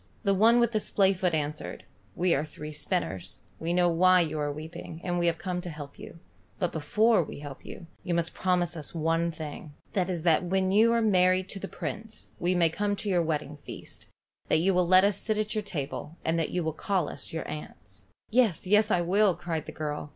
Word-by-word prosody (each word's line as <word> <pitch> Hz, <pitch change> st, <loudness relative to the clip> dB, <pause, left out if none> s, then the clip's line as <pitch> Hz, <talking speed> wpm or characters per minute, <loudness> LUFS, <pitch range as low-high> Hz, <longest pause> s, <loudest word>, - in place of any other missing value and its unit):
The 200 Hz, -2 st, +3 dB
one 225 Hz, +5 st, +5 dB
with 235 Hz, -1 st, +3 dB
the 215 Hz, -, +1 dB
splayfoot 190 Hz, -4 st, +2 dB
answered. 150 Hz, 0 st, -4 dB, 0.3 s
"We 180 Hz, -1 st, +2 dB
are 145 Hz, -, +1 dB
three 150 Hz, 0 st, -8 dB
spinners. 95 Hz, -, -2 dB, 0.2 s
We 165 Hz, +1 st, -2 dB
know 175 Hz, 0 st, +3 dB
why 180 Hz, +2 st, +5 dB
you 155 Hz, -2 st, -2 dB
are 145 Hz, 0 st, -1 dB
weeping, 160 Hz, +2 st, -8 dB
and 175 Hz, -1 st, -1 dB
we 175 Hz, -, +2 dB
have 165 Hz, -1 st, +1 dB
come 180 Hz, +1 st, -3 dB
to 175 Hz, -, -6 dB
help 145 Hz, -3 st, -9 dB
you, -, -, -10 dB, 0.4 s
but 180 Hz, -4 st, -1 dB
before 210 Hz, +8 st, +3 dB
we 160 Hz, -, -6 dB
help 145 Hz, -2 st, -9 dB
you, 175 Hz, -, -9 dB, 0.2 s
you 175 Hz, -, -1 dB
must 170 Hz, 0 st, +1 dB
promise 180 Hz, -2 st, +1 dB
us 155 Hz, +1 st, -7 dB
one 165 Hz, +1 st, +1 dB
thing: 150 Hz, -2 st, -8 dB, 0.2 s
that 185 Hz, -2 st, 0 dB
is 175 Hz, -3 st, -2 dB
that 170 Hz, 0 st, +4 dB
when 190 Hz, +1 st, +1 dB
you 220 Hz, +4 st, +5 dB
are 235 Hz, -1 st, +2 dB
married 185 Hz, -2 st, +3 dB
to 195 Hz, -, -3 dB
the 195 Hz, -, -5 dB
Prince, 220 Hz, +2 st, -6 dB
we 180 Hz, +1 st, +1 dB
may 170 Hz, -2 st, +4 dB
come 205 Hz, +5 st, -1 dB
to 205 Hz, -, -4 dB
your 180 Hz, -3 st, +3 dB
wedding 150 Hz, -2 st, -2 dB
feast, 145 Hz, -, -10 dB, 0.4 s
that -, -, +3 dB
you 185 Hz, +4 st, +2 dB
will 180 Hz, -1 st, +2 dB
let 185 Hz, +1 st, +7 dB
us 200 Hz, -1 st, +2 dB
sit 215 Hz, -1 st, -1 dB
at 215 Hz, 0 st, -1 dB
your 215 Hz, -, 0 dB
table, 155 Hz, -3 st, -5 dB
and 165 Hz, +1 st, +1 dB
that 160 Hz, -, 0 dB
you 180 Hz, -, -1 dB
will 160 Hz, -1 st, -1 dB
call 180 Hz, 0 st, 0 dB
us 140 Hz, -, -5 dB
your 160 Hz, -, -4 dB
aunts." 105 Hz, -10 st, -8 dB, 0.3 s
"Yes, 225 Hz, -9 st, +3 dB
yes; 210 Hz, +3 st, +4 dB
I 175 Hz, -, +3 dB
will, 195 Hz, +5 st, +3 dB
I -, -, +5 dB
will," 180 Hz, -, 0 dB
cried 165 Hz, -3 st, -4 dB
the -, -, -5 dB
girl. 150 Hz, -1 st, -4 dB
175 Hz, 230 wpm, -28 LUFS, 155-195 Hz, 0.4 s, let